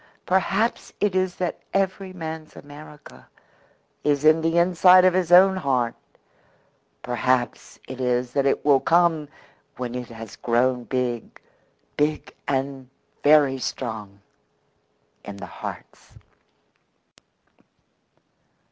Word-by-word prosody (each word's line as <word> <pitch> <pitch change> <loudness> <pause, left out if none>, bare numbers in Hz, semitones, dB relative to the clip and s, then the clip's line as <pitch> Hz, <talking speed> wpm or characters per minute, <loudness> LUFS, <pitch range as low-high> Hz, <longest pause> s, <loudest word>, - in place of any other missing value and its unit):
"Perhaps 195 +4 0
it 205 -2 +1
is 185 -1 0
that 180 -2 -3 0.2
every 195 0 -1
man's 160 -3 -7
America 145 +1 -13 0.8
is 145 0 +1
in 155 +1 +5
the 165 +1 0
inside 180 +1 +6
of 185 - +4
his 180 -2 0
own 190 +2 +7
heart. 130 -8 0 1.1
Perhaps 125 0 -1
it 130 0 -7
is 125 0 -1
that 140 -1 +1
it 135 - 0
will 140 -2 +5
come 165 -1 +2 0.5
when 125 -1 -5
it 125 -1 -6
has 115 -2 -10
grown 125 +1 0
big 125 -3 -3 0.6
big 150 +1 -1
and 135 -1 -3 0.3
very 145 -3 +4
strong 110 -6 -6 1.0
in 100 -1 -9
the - - -8
hearts." - - -10
145 Hz, 110 wpm, -23 LUFS, 125-175 Hz, 1.1 s, own